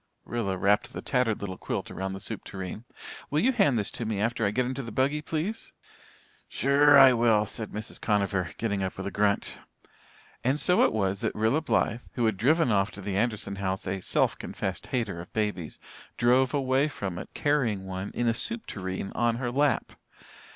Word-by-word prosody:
Rilla 105 -6 -2
wrapped 105 +6 +2
the - - -6
tattered 125 -5 +1
little 95 -2 -5
quilt - - -4
around 95 0 -4
the 95 - -6
soup 110 +1 -4
tureen. 95 +4 -7 0.4
"Will 150 - +1
you 255 +9 +3
hand 195 - +3
this 105 0 -1
to - - -5
me 110 -3 -2
after 115 +2 0
I 100 - +3
get 125 +5 0
into 130 +2 -3
the 115 -3 -7
buggy, 140 +6 +1
please?" 165 +9 -4 0.8
"Sure 140 +2 +5
I 135 -2 +9
will," 115 -3 +3
said 110 +1 -5
Mrs. 105 +1 -7
Conover, 100 -4 0
getting 100 -3 -1
up 95 -1 -3
with 95 - -5
a 100 - -3
grunt. 100 -1 0 0.8
And 135 +4 +2
so 180 +3 +4
it - - +4
was 100 -3 0
that - - -1
Rilla 110 +8 +2
Blythe, 120 -6 0
who 120 - 0
had 110 -3 +1
driven 150 - +3 0.2
to 105 - -11
the 100 0 -4
Anderson 105 -2 -1
house 95 -1 -2
a 95 0 -3
self - - +1
confessed - - -4
hater 105 -9 -2
of 85 - -12
babies, 105 -7 -2 0.4
drove 125 +1 +4
away 135 +1 +2
from 95 - -5
it - - -8
carrying 125 -10 +1
one 95 +1 -4
in 120 - 0
a 115 - +3
soup 230 - -1
tureen 95 0 -5
on 120 0 +1
her 120 0 -2
lap! 140 +2 +1
115 Hz, 195 wpm, -27 LUFS, 100-130 Hz, 0.8 s, I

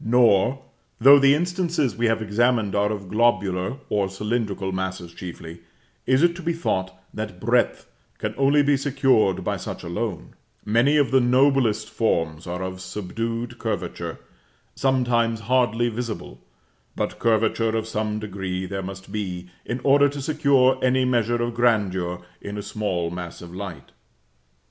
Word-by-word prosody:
Nor, 120 +2 +3 0.4
though 140 +4 +8
the 140 +1 +5
instances 175 -4 0
we 120 0 +1
have 115 0 +1
examined 110 -1 +1
are 105 +1 +1
of 100 -3 -5
globular 100 -2 +1
or 100 -2 0
cylindrical 100 -1 -2
masses 95 -2 -4
chiefly, 85 -2 -9 0.5
is 130 +4 +4
it 170 0 +4
to - - -7
be 170 0 -1
thought 95 - -1 0.2
that 105 -4 -6
breadth 120 +4 +1 0.3
can - - -3
only 140 +2 +4
be 140 0 +3
secured 135 -8 +2
by - - -1
such - - -7
alone: 85 0 -4 0.3
many 120 +8 +3
of 140 -5 +2
the 135 - +5
noblest 125 -3 +3
forms 85 -9 -1
are 90 +1 -4
of 95 0 -5
subdued 115 +5 -4
curvature, - - -4 0.6
sometimes 120 -4 +1
hardly 120 0 +2
visible; 115 -1 -5 0.6
but - - -3
curvature 115 0 +1
of 110 0 -3
some 110 -1 -2
degree 95 -3 -4
there 95 +1 -4
must 95 0 -8
be, 90 -4 -5
in 120 - -3
order 140 +1 +5
to 145 +1 -6
secure 135 -3 +3
any 130 0 +2
measure 120 -2 +1
of 120 0 -2
grandeur 95 -7 0 0.2
in 100 +1 -6
a 105 - -4
small 100 -5 -2
mass 90 -1 -7
of 85 0 -11
light. 90 -7 -7
110 Hz, 150 wpm, -23 LUFS, 95-130 Hz, 0.6 s, though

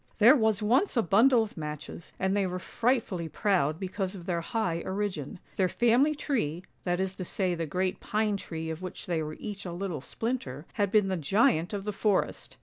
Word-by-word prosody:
" - - -34
There 235 +7 +8
was 220 -5 +2
once 255 - +2
a 230 - +4
bundle 230 +6 +5
of 215 - -8
matches, 150 +1 -6
and 190 +1 +1
they 200 -2 +2
were 180 0 -3
fright 240 +6 +1
fully 170 -5 -5
proud 170 -5 +1
because 190 0 -3
of 175 -3 -9
their 170 -2 -1
high 170 -3 -1
origin. 190 -5 -3 0.2
Their 185 -3 +3
family 245 +9 +3
tree, 185 - -1 0.2
that 175 0 +1
is 190 0 -1
to 185 - -3
say 185 0 -1
the 165 -2 -3
great 185 +4 -1
pine 215 -1 0
tree 160 -4 -5
of 160 +2 -6
which 185 -1 -6
they 170 -3 0
were 155 0 -5
each 205 -2 -6
a 180 - -5
little 175 -4 -4
splinter, 160 - -4
had 205 -3 +1
been 210 -2 +4
the 190 - 0
giant 165 +1 +2
of 200 -2 -3
the 210 0 -3
forest. 200 -1 0
190 Hz, 215 wpm, -29 LUFS, 170-215 Hz, 0.2 s, There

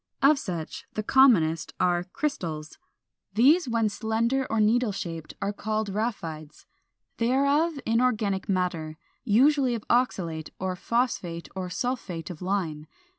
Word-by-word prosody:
Of 280 +1 +6
such 170 -8 -5
the 215 - -1
commonest 200 - +4
are 175 -1 +2
422. 180 - -12
=Crystals.= 160 - -3 0.6
These 275 +7 +5
when 230 -2 +2
slender 230 +5 0
or 225 - 0
needle 225 +2 +3
shaped 165 -5 -6
are 200 +1 -1
called 215 0 -2
RHAPHIDES. 165 -8 -4 0.5
They 230 +1 +1
are 280 +4 +3
of 320 -4 -7
inorganic 220 -5 +1
matter, 175 -5 -1 0.3
usually 260 +3 +4
of 220 - -6
oxalate 170 -10 0
or 185 0 -2
phosphate 180 -6 -2
or 185 -1 -4
sulphate 185 -6 -3
of 170 - -10
lime. 175 -5 -2
210 Hz, 135 wpm, -27 LUFS, 175-245 Hz, 0.6 s, Of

